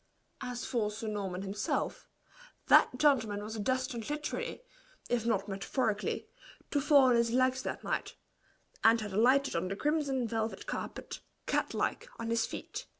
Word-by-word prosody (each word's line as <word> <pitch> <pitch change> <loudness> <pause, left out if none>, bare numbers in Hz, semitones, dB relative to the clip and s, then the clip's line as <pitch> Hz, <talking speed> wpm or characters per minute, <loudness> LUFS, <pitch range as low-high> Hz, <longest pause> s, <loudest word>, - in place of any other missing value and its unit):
As 250 -1 -4
for 225 -4 0
Sir 220 +1 -6
Norman 195 -3 -3
himself, 200 +2 -2 0.6
that 250 - +6
gentleman 225 -8 +3
was 220 +1 -5
destined 255 +1 -1
literally, 300 +10 -3 0.5
if 235 -1 0
not 200 -3 +1
metaphorically, 210 +2 -1 0.4
to 290 - +2
fall 285 -1 +6
on 255 -2 +5
his 235 0 +3
legs 255 +2 +2
that - - -4
night, - - -2 0.7
and 225 +1 +6
had 210 -3 -5
alighted 260 +7 +4
on 170 +2 0
the 195 - -3
crimson 280 -2 0
velvet 225 0 -2
carpet, - - -5 0.3
cat - - 0
like, - - -1
on 230 - -3
his 230 -1 +2
feet. - - -6
230 Hz, 150 wpm, -32 LUFS, 210-260 Hz, 0.7 s, that